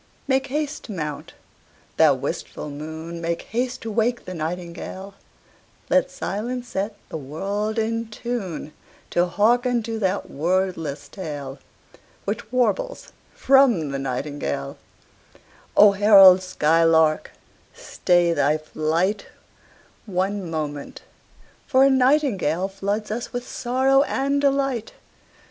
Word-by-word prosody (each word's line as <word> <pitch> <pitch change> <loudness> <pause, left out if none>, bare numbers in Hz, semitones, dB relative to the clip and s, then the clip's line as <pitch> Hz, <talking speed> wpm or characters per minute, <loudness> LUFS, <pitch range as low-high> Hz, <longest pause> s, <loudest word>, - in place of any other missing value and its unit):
Make 265 0 +1
haste 295 +2 -3
to - - -8
mount, 150 -6 -5 0.6
thou - - +6
wistful 150 - -5
moon, 160 +3 -7
Make 170 0 -2
haste 250 +2 -3
to 225 - -5
wake 235 +3 0
the 185 - -6
nightingale: 180 +3 -6 0.8
Let 275 -1 +3
silence 245 -1 -4
set 205 +1 -3
the - - -4
world 200 - -3
in 230 +1 -1
tune 215 -9 -5 0.4
To 175 +1 +2
hearken 240 +5 +2
to 225 0 -4
that 195 -1 -1
wordless 165 -3 -2
tale 145 -6 -7 0.7
Which 210 +2 -4
warbles - - -1 0.2
from 250 - +4
the 135 - -3
nightingale 135 - -4 1.0
O 205 0 +8
herald 195 -2 +7
skylark, 160 -2 +3 0.5
stay 175 -1 +1
thy 150 -1 +2
flight 160 +6 -1 0.8
One 190 -1 -2
moment, 150 -3 -5 0.6
for 260 0 +4
a 275 - +5
nightingale 250 - +2
Floods 200 +2 -3
us 230 +2 -4
with 245 0 -5
sorrow 265 +2 +2
and 280 0 0
delight. 275 -4 0
195 Hz, 115 wpm, -23 LUFS, 160-245 Hz, 1.0 s, O